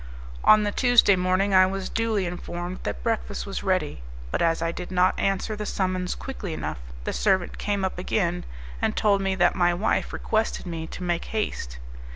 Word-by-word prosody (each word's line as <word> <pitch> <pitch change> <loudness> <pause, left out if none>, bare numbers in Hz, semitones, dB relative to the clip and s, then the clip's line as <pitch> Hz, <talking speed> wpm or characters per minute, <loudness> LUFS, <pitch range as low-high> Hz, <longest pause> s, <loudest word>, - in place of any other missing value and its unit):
On 215 0 +7
the 205 - 0
Tuesday 245 -4 +5
morning 185 +2 +1
I 185 0 +7
was 195 0 -3
duly 225 -4 0
informed 175 +1 -5
that - - -4
breakfast 225 -3 -2
was 195 - -4
ready, 185 - 0 0.3
but - - -1
as 165 -1 +2
I 165 0 0
did 175 +1 -7
not 185 0 +3
answer 195 +2 0
the 210 0 -5
summons 185 -1 -1
quickly 210 -10 -6
enough 110 - -4 0.2
the - - -2
servant 190 -4 +1
came 200 -2 0
up 185 - -3
again, 180 -2 0 0.4
and - - +1
told 200 -2 +3
me 195 0 0
that 175 -1 +4
my 175 -1 +2
wife 200 +5 0
requested 220 -2 -1
me 165 -2 -5
to 180 - -7
make 175 -1 -1
haste. 130 - -3
185 Hz, 190 wpm, -25 LUFS, 175-205 Hz, 0.4 s, On